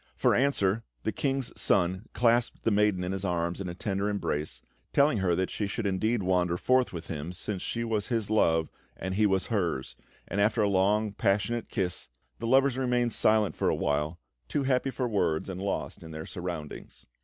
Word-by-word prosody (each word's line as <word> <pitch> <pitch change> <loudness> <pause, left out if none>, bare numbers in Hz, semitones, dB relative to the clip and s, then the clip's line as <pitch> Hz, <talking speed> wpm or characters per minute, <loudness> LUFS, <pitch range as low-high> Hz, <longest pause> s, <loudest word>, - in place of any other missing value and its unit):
For - - +3
answer, 115 -6 +2 0.2
the - - 0
King's 135 0 -1
Son 95 +3 +1
clasped 120 0 +2
the 115 - +2
maiden 105 -3 +2
in 90 - -2
his 95 0 -3
arms 85 -1 -1
in 90 - -4
a 85 - -6
tender 100 +1 -1
embrace, 80 -7 -3 0.3
telling 140 -5 +4
her 90 -3 +2
that 95 +1 -1
she 105 - -2
should 105 +2 -3
indeed 105 +3 +1
wander 90 -1 +1
forth 130 +5 +2
with 85 -2 -7
him, 80 +2 -4
since 95 +1 -4
she 115 - -2
was 110 -3 -1
his 115 -4 -1
love 80 -7 +2 0.3
and 95 - -3
he 105 +2 +3
was 95 -2 +1
hers; 85 - -1 0.3
and 100 +3 -1
after 105 +1 +3
a - - +3
long 100 +2 +2
passionate 105 +3 0
kiss, 90 -5 -2 0.3
the - - -3
lovers 135 +1 +4
remained 125 -2 +1
silent 110 -1 +3
for - - +1
a - - +2
while, 75 +3 -1 0.3
too 140 - -1
happy 130 0 +1
for 130 -1 -2
words 95 -8 0
and 95 -1 -5
lost 100 - -3
to 85 - -11
their 80 -1 -7
surroundings. 85 -5 -7
100 Hz, 195 wpm, -28 LUFS, 90-115 Hz, 0.3 s, telling